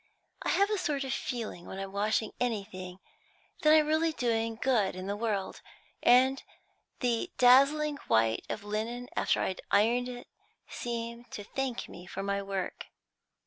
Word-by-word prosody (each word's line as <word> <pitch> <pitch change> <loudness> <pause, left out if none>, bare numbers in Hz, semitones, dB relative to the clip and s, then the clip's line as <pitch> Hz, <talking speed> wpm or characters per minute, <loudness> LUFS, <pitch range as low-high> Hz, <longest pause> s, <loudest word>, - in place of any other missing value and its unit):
I - - -2
have 400 +2 +3
a 420 - +1
sort 290 -6 -1
of 265 0 -2
feeling 235 -10 -4
when 190 - -7
I'm 195 0 -5
washing 210 +2 0
anything, 195 -6 -3 0.6
that 305 - +5
I'm 310 -1 +6
really 315 +2 +2
doing 230 -4 0
good 225 -9 +2
in 185 0 -6
the 200 +1 -2
world, 205 -3 -2 0.4
and 260 +2 +5 0.6
the 240 -3 0
dazzling 280 +4 +5
white 110 0 +3
of 205 - -4
linen 225 +4 -3
after - - +2
I'd 185 - -2
ironed 235 +5 +3
it 245 -1 -8 0.4
seemed 235 0 -5
to 205 - -5
thank 260 +3 -3
me 175 +1 -11
for 195 - -5
my 200 0 -1
work." 195 -1 -4
230 Hz, 155 wpm, -30 LUFS, 200-260 Hz, 0.6 s, I'm